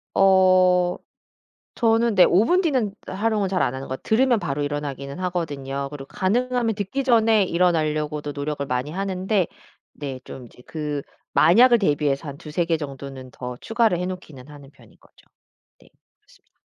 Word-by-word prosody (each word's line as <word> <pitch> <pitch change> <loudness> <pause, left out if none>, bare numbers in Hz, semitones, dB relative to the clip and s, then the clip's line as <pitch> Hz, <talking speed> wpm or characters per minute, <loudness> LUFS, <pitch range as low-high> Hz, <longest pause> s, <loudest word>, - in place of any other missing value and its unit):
어 185 -2 +4 0.8
저는 230 -1 +2
네 185 - +7
5 195 +5 +4
분 360 +8 +3
뒤는 260 - 0
활용을 210 0 -1
잘 185 -1 0
안 125 - +1
하는 135 +1 -6
거 130 - -4
들으면 240 - +2
바로 145 -6 -3
일어나기는 145 0 -4
하거든요. 145 -7 -3
그리고 140 -2 -8
가능하면 235 - 0
듣기 205 +7 -3
전에 225 -4 +4
일어나려고도 155 -4 0
노력을 145 0 -4
많이 125 +2 -2
하는데 190 +1 -1 0.5
네 135 -3 -6
좀 130 -2 -10
이제 120 - -17
그 150 -2 -4 0.3
만약을 240 +7 +6
대비해서 145 -4 0
한 140 - -9
2-3 155 +4 -2
개 165 -1 +1
정도는 135 -3 -8
더 125 -1 -7
추가를 225 -6 +1
해 180 - -2
놓기는 160 -8 -8
하는 145 -2 -13
편인 - - -21
거죠. - - -24 0.6
네 - - -21 0.3
그렇습니다. - - -27
175 Hz, 325 characters per minute, -23 LUFS, 145-205 Hz, 0.8 s, 네